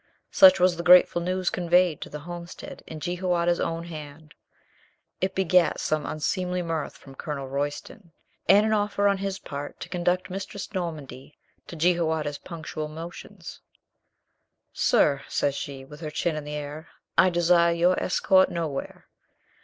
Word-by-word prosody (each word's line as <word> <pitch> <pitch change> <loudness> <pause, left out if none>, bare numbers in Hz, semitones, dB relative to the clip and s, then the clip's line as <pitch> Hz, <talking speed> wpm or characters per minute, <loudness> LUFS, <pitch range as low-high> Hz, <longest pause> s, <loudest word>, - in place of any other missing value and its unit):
Such 285 -1 +7
was 180 -1 +3
the 170 - -4
grateful 175 0 +6
news 185 +1 -1
conveyed 175 -2 +2
to - - -6
the 150 - -7
homestead 170 +1 -9
in 155 - -7
Jehoiada's 175 +1 0
own 165 0 -2
hand. 155 -2 -10 0.9
It 190 +1 -1
begat 180 -4 +3
some 155 -1 -1
unseemly 180 +4 -2
mirth 165 -2 -3
from 135 - -14
Colonel 140 0 -5
Royston 145 +6 -5 0.4
and 205 +3 +7
an 220 - +1
offer 205 -1 0
of 200 -1 +3
his 195 -1 -3
part 145 -4 -7
to - - -7
conduct 180 +1 -1
Mistress 195 +2 -6
Nor 175 -3 -1
mandy 140 -2 -11 0.3
to - - -8
Jehoiada's 160 -3 0
punctual 160 -2 -6
motions. 165 +3 -9 1.1
"Sir," 140 -2 +3
says 140 - 0
she, 135 -1 -6
with 150 +2 -12
her 155 -2 -5
chin 160 +2 -1
in 155 -1 -5
the 150 0 -5
air, 150 +2 -6 0.3
"I 185 - +6
desire 170 0 +4
your 175 +2 +2
escort 190 +1 +3
nowhere." 160 -5 -4
170 Hz, 155 wpm, -26 LUFS, 150-180 Hz, 1.1 s, Such